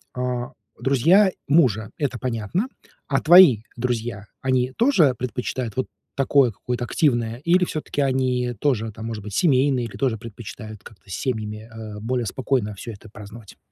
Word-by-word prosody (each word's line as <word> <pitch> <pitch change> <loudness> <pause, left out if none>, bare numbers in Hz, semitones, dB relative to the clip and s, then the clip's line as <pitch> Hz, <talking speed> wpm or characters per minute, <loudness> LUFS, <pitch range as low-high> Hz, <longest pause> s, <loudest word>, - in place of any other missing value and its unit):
а, 125 -1 -3 0.3
друзья 170 - +4 0.2
мужа- 115 - +3
это 140 -5 -2
понятно, 125 - -2 0.4
а 135 - +2
твои 160 - +7
друзья, 120 -4 -2 0.2
они 130 -1 +1
тоже 210 - +4
предпочитают 125 -2 -3
вот 130 - 0 0.3
такое 135 -2 +3
какое-то 120 +4 -4
активное, 120 -3 +1
или 170 +6 +3
всё-таки 155 -3 -3
они 130 -2 0
тоже, 115 -6 0
там, 110 +2 -9
может 110 -3 -5
быть, 105 - -8
семейные 135 -5 +3
или 110 - -9
тоже 125 -5 0
предпочитают 110 -1 -9
как-то 100 -2 -16
семьями, 110 0 -4
а, 110 -2 -8
более 120 +2 -2
спокойно 115 -2 -1
всё 115 +4 -7
это 105 +1 -13
праздновать? 105 +1 -12
125 Hz, 150 wpm, -23 LUFS, 110-135 Hz, 0.4 s, твои